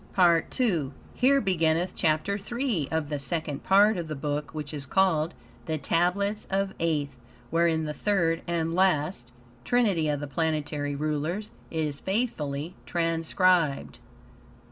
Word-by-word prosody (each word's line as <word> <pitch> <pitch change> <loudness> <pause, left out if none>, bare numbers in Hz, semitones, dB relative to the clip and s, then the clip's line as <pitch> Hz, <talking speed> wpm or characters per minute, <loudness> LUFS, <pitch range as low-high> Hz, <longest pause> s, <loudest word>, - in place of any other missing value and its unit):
PART 170 0 +3
II 170 - +1 0.2
Here 275 +2 +4
beginneth 175 -4 +1
Chapter 160 +4 +1
3 230 - -2
of 160 -2 -1
the 145 -2 -2
Second 155 -1 -3
Part 205 +2 +5
of 170 -2 -4
the 155 - -4
Book 145 +1 -3
which 150 -1 -6
is 140 -2 -6
called 170 -2 +2 0.3
"The 160 - -1
Tablets 195 +7 0
of 195 0 -1
Aeth," 155 -4 0 0.4
wherein 165 -1 +2
the 150 - -3
Third, 170 -3 +1
and 165 -1 -1
last, 155 -8 +1 0.3
Trinity 200 - +2
of 145 -1 0
the 145 - -4
Planetary 150 -1 -2
Rulers 155 +7 -2 0.2
is 155 -3 -2
faithfully 175 - -2
transcribed. 165 -2 +1
165 Hz, 135 wpm, -27 LUFS, 150-190 Hz, 0.4 s, Part